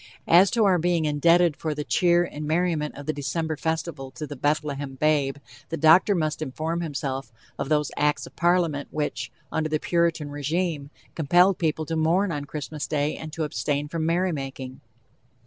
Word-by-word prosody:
As 180 +3 +6
to 225 0 +2
our 185 -3 +4
being 170 -1 +1
indebted 165 +2 +3
for 155 -1 -3
the 150 - -3
cheer 175 +2 +3
and 150 -3 -6
merriment 160 -2 0
of 145 - -8
the 155 - -1
December 155 +3 -2
festival 160 -3 -3
to 150 +3 -7
the 145 - -7
"Bethlehem 145 -1 -1
babe," 145 -1 +1 0.3
the 165 - -3
doctor 165 +6 +5
must 155 -2 -1
inform 155 +4 -3
himself 135 -6 -4 0.3
of 135 - -3
those 150 -2 +1
acts 150 0 +1
of - - -14
Parliament 170 -5 +1
which, 145 -4 -3 0.2
under 155 0 -1
the 155 0 0
Puritan 165 -4 0
regime, 145 0 -2 0.2
compelled 175 +5 +3
people 160 -1 0
to 165 - -3
mourn 170 +5 +2
on 145 -2 -3
Christmas 150 0 -5
day 150 0 0
and 160 -1 -8
to 165 - -2
abstain 145 -1 -2
from 160 +1 -3
merrymaking. 135 -7 -2
155 Hz, 175 wpm, -25 LUFS, 145-170 Hz, 0.3 s, As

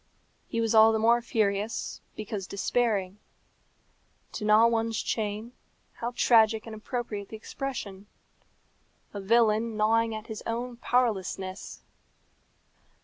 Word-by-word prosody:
He 230 - -3
was 225 0 +1
all 220 0 +7
the 220 - +1
more 230 +2 +4
furious, 215 -2 -1
because 210 -3 -5
despairing. 200 -2 -1 1.1
To - - -6
gnaw 215 +2 +6
one's 225 -1 +1
chain 215 +1 -3 0.4
how 235 +1 -5
tragic 220 -2 +4
and 225 - -8
appropriate 215 -2 -5
the 220 - -7
expression! 210 -5 -6 1.1
A 200 - -5
villain 225 +1 +2
gnawing 225 +1 +2
at 215 0 -7
his 220 -2 -7
own 240 +1 -3
powerlessness! 200 -6 -1
220 Hz, 115 wpm, -28 LUFS, 210-230 Hz, 1.1 s, all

